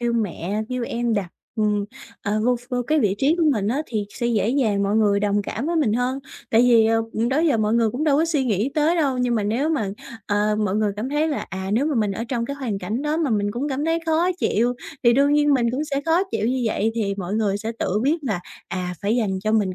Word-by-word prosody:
kêu 240 0 0
mẹ 210 -2 -2
kêu 255 -1 -3
em 235 -1 -1
đặt, 200 -4 -1 0.3
ừm, 210 -2 +1 0.4
ờ, 210 +1 0
vô 250 +1 +3
ph 245 +2 -17
vô 250 -1 0
cái 310 0 +2
vị 205 -5 +2
trí 295 +5 +3
của 340 - +2
mình 205 -5 -1
á 270 +7 0
thì 215 -3 -2
sẽ 235 - -3
dễ 220 -3 +1
dàng 225 -6 +1
mọi 200 +2 +1
người 205 -2 +3
đồng 205 0 +1
cảm 230 +6 -4
với 340 +1 0
mình 290 -10 +2
hơn, 250 +3 0 0.3
tại 225 - +5
vì, 235 -3 +5
ừm, 225 0 0
đó 265 +3 +1
giờ 310 -6 +3
mọi 215 0 +1
người 230 -2 +3
cũng 260 +8 -2
đâu 290 -3 +3
có 320 - +3
suy 310 -5 0
nghĩ 220 +2 0
tới 315 +2 +2
đâu. 275 -6 +1
Nhưng 250 -1 +1
mà 220 - +1
nếu 230 +9 0
mà, 275 -11 0 0.4
ờ, 210 +1 +1
mọi 210 -3 0
người 215 -1 +1
cảm 220 +5 -3
thấy 295 +3 +1
là, 295 - -3
à, 190 0 -4
nếu 245 +7 +2
mà 310 - 0
mình 215 -4 +1
ở 225 - -4
trong 235 -2 -1
cái 280 - -4
hoàn 240 -8 -3
cảnh 215 +8 -3
đó 300 +1 0
mà 320 -5 0
mình 205 -2 +1
cũng 250 +7 -3
cảm 280 +1 -2
thấy 325 +1 +1
khó 325 +3 +2
chịu 240 -4 +1 0.3
thì 235 - +6
đương 280 +3 +3
nhiên 295 -1 +4
mình 235 -3 +2
cũng 270 +5 -2
sẽ 280 -2 -2
khó 330 +3 +3
chịu 215 - -1
như 255 +1 0
vậy 220 0 0
thì 205 -4 -1
mọi 190 0 -3
người 210 -3 +1
sẽ 220 +2 -4
tự 200 - 0
biết 290 +5 +2
là, 205 -8 -1 0.3
à, 180 -1 -3
phải 210 +4 +1
dành 200 -6 0
cho 215 - +1
mình 205 -4 +1
235 Hz, 275 wpm, -22 LUFS, 210-275 Hz, 0.4 s, thì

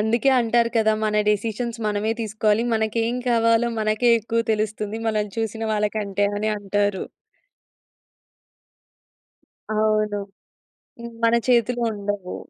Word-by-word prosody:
అందుకే 230 +5 +2
అంటారు 235 0 +2
కదా! 220 -1 +3
మన 210 0 0
డెసిషన్స్ 225 +3 -1
మనమే 210 +1 0
తీసుకోవాలి. 215 0 +1
మనకేం 225 +2 0
కావాలో 230 0 +3
మనకే 215 +3 +1
ఎక్కువ 230 +2 -1
తెలుస్తుంది 215 0 -2
మనల్ని 210 -2 -1
చూసిన 225 0 -3
వాళ్ళకంటే 210 -1 -1
అని 215 +1 0
అంటారు. 205 -1 -1 2.7
అవును. 215 -1 +1 0.8
హ్మ్. 235 0 -8
మన 230 +1 +4
చేతిలో 240 0 +2
ఉండవు. 200 -2 -4
215 Hz, 105 wpm, -23 LUFS, 210-230 Hz, 2.7 s, మన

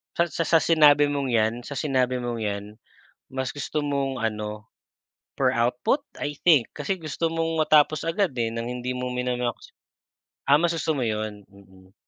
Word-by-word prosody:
Sa 170 0 +1
sa 165 - -1
sa 165 +1 +4
sinabi 145 -3 +5
mong 140 -1 -1
yan 110 0 +2
sa 145 - -6
sinabi 130 -4 0
mong 120 -1 -3
yan 100 -2 -3 0.7
mas 130 -1 -3
gusto 145 +1 -3
mong 140 -2 -1
ano 105 -1 -4 0.7
per 130 -1 +2
output? 125 - +1 0.2
I 145 0 -3
think. 150 -5 +4
Kasi 195 -1 -2
gusto 165 0 -2
mong 165 -1 0
matapos 155 0 +4
agad, 165 -1 0
eh, 115 -2 -1
ng 115 +1 -4
hindi 125 +1 -4
mo 125 0 -3
mina-max. 125 -1 -3 0.8
Ah, 140 - +5
mas 165 +3 +3
gusto 160 -1 -1
mo 135 - -2
yon? 110 -2 -3
Mm. 95 -1 -19
130 Hz, 170 wpm, -25 LUFS, 115-155 Hz, 0.8 s, sinabi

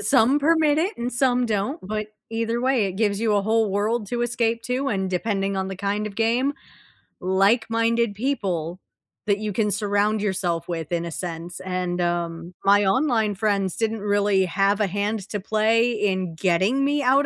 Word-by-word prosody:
some 225 +6 +4
permit 310 0 +3
it 370 +7 -1
and 240 +1 -3
some 250 -1 +2
don't, 215 - -1
but 215 0 -3 0.2
either 230 +1 -1
way, 255 -5 +2
it 190 - -3
gives 205 -1 0
you 220 -2 +2
a 200 - +2
whole 220 -1 +1
world 210 +2 0
to 240 0 -1
escape 230 -1 0
to, 260 +2 -1
and 190 -5 -1
depending 195 +1 -1
on 190 0 -2
the 190 - -6
kind 205 +2 -2
of 200 - -7
game 235 +5 +1 0.7
like 195 +6 +2
minded 230 -1 +1
people 185 - -2 0.5
that 200 -1 +3
you 210 -1 -3
can 210 +1 +1
surround 205 +1 +1
yourself 180 -4 -1
with 165 -2 -4
in 170 -1 -1
a 170 - -5
sense. 170 0 -6
and, 180 -1 -2
um 170 0 -2
my 205 +1 +5
online 225 -3 +2
friends 200 -3 0
didn't 225 -1 -1
really 205 -2 +2
have 195 +3 +1
a 205 - +2
hand 205 +3 -1
to 205 - -3
play 220 +4 +2
in 190 -6 -1
getting 190 +10 +2
me 290 +1 +1
out 275 +3 +4
210 Hz, 185 wpm, -23 LUFS, 190-230 Hz, 0.7 s, my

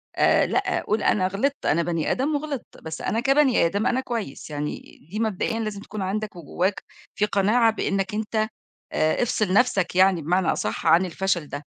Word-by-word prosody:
آآ - - +4
لأ، 380 -2 0
قول 215 +1 0
أنا 185 -3 +2
غلطت 270 +9 -2
أنا 170 +3 +2
بَني 165 -2 -1
آدم 290 +4 0
وغلطت، 285 -3 -5
بس 160 0 -6
أنا 225 - -1
كبَني 270 - +3
آدم 200 +6 0
أنا 260 +2 +1
كويس 225 - -5
يعني، 150 0 -4 0.3
دي 215 - -3
مبدئيًا 225 +1 -1
لازم 215 -2 -3
تكون 215 -1 -7
عندك 210 +1 -3
وجوّاك 175 +4 -2 0.3
في 210 - +2
قناعة 215 +3 +3
بإنّك 195 -2 -1
أنت 215 +1 -3 0.6
آآ، 155 +9 +2
افصل 215 -5 0
نَفْسك 200 -6 +2
يعني 185 -2 +4
بمعنى 175 +3 +1
أصح 105 - -3
عن 170 +4 +5
الفشل 180 -2 -1
ده. 145 +1 -6
200 Hz, 180 wpm, -24 LUFS, 175-230 Hz, 0.6 s, عن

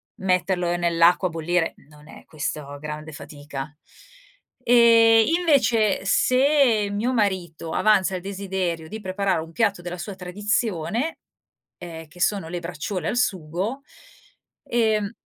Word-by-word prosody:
metterlo 180 -1 0
nell'acqua 170 +1 +3
a - - -11
bollire, 165 +1 -1
non 150 0 -17
è - - -13
questo 145 -2 -5
grande 150 +1 -7
fatica. 145 -1 -8 0.9
E, 230 -1 +6
invece, 245 - +2
se 255 -2 +3
mio 230 +6 -1
marito 185 -7 -1
avanza 195 -3 +3
il 180 - -4
desiderio 190 -4 -3
di 220 +1 -6
preparare 190 -1 -1
un 165 +1 -10
piatto 200 -4 +1
della 175 +1 -6
sua 195 +3 -6
tradizione, 210 - -2 0.6
ehm, 165 -2 -9
che 180 - -16
sono 195 -6 0
le 175 0 -4
braciole 170 +1 -4
al - - -2
sugo, 195 - -2 0.8
ehm 220 -3 0
185 Hz, 125 wpm, -23 LUFS, 165-215 Hz, 0.9 s, E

